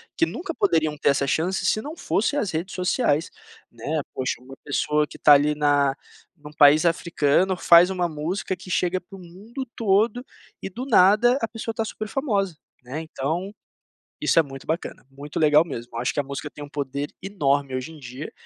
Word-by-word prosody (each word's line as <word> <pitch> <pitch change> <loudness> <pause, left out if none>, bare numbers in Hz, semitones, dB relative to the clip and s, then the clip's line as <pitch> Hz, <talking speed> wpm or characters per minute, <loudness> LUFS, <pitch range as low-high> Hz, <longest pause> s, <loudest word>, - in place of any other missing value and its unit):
que 330 - +3
nunca 335 0 -5
poderiam 160 - +1
ter 145 - +2
essa 140 0 +2
chance 175 +7 0
se 215 - +1
não 310 +5 -8
fosse 280 +8 0
as 205 - -1
redes 170 +4 -4
sociais, 180 - +1 0.4
né. 145 +7 -3
Poxa, 130 -2 -2
uma 135 +1 -12
pessoa 150 +1 0
que - - -12
está 145 - +7
ali 145 +1 +4
na 145 -2 +2 0.4
num 150 0 -12
país 150 +2 +6
africano 170 +2 +1
faz 170 +2 +6
uma 180 -2 -1
música 170 +5 -3
que 185 +1 -13
chega 180 +1 0
pro 195 +2 -13
mundo 200 +9 -9
todo 225 +4 +1 0.4
e 195 - -5
do 245 +7 -6
nada, 225 +3 +5
a 230 - 0
pessoa 225 0 -5
está 225 - -1
super 215 0 -6
famosa, 200 - -1 0.3
né, 135 +6 -5
então 160 +5 -4 0.7
isso - - +3
é - - +7
muito 135 -2 -11
bacana, 165 +3 -4
muito 145 +3 -6
legal 150 +1 +5
mesmo. 120 -6 -8
Acho 120 +1 -1
que - - +1
a - - 0
música 140 +2 -6
tem 145 - -11
um 145 - -8
poder 140 0 -4
enorme 140 -8 0
hoje 130 +5 -4
em 160 - -12
dia, 130 +2 -8
160 Hz, 190 wpm, -24 LUFS, 145-195 Hz, 0.7 s, está